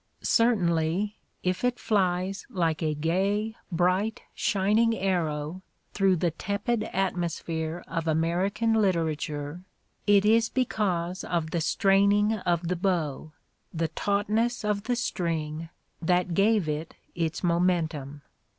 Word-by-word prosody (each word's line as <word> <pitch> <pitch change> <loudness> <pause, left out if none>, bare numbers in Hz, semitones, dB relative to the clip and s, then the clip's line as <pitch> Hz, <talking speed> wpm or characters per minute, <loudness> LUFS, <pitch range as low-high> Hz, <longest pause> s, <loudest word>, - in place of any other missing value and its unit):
Certainly, 195 -3 +2 0.3
if 180 +3 -1
it 245 0 +1
flies 190 -1 0
like 165 -3 0
a 155 -2 0
gay, 195 +8 0 0.2
bright, 185 +5 +1
shining 215 +2 +2
arrow 170 -3 -1 0.3
through 195 -2 +3
the 175 0 0
tepid 210 +6 -2
atmosphere 170 -3 -2
of 165 -1 -3
American 175 +8 +1
literature, 160 -5 -1 0.4
it 205 -1 +5
is 225 +2 +4
because 185 -8 -1
of 165 -2 -2
the 170 - 0
straining 200 +5 +3
of 175 -5 -1
the 180 - 0
bow, 165 -5 -1 0.4
the 165 -1 -1
tautness 215 +7 0
of 210 0 -1
the 245 - +1
string, 165 -8 -2 0.3
that 180 +1 +1
gave 200 -1 +3
it 155 +2 -3 0.2
its 165 0 -2
momentum. 165 -5 0
180 Hz, 115 wpm, -27 LUFS, 165-205 Hz, 0.4 s, it